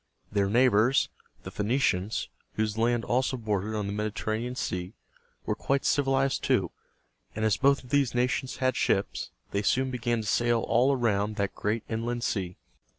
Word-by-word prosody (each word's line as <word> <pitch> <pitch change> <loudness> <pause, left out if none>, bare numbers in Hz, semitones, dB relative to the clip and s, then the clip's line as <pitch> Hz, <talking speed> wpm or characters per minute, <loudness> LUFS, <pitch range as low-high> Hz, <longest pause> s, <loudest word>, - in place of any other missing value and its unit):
Their 100 -1 +1
neighbors, 120 +2 +4 0.3
the - - -7
Phoe - - -4
ni´ 115 +5 +1
cians, 105 -6 0 0.3
whose 110 -1 -1
land 115 +1 +1
also 130 +1 +1
bordered 110 -2 -2
on 105 -1 -1
the 100 - -3
Mediterranean 110 +3 -2
Sea, 90 -5 -3 0.5
were - - 0
quite 140 0 -1
civilized 135 -1 +2
too; - - +1 0.6
and 110 +1 -1
as 110 - +3
both 140 +1 +3
of 125 - -15
these 140 -4 +2
nations 125 +2 0
had 130 0 +1
ships, 95 - 0 0.2
they 100 - 0
soon 130 +5 +1
began 120 -2 -1
to 110 - -6
sail 120 +1 +2
all 120 +5 +3
around 110 -5 +1
that 100 -1 -1
great 105 +2 -2
inland 115 +1 -2
sea. 95 -6 -2
115 Hz, 170 wpm, -28 LUFS, 105-130 Hz, 0.6 s, neighbors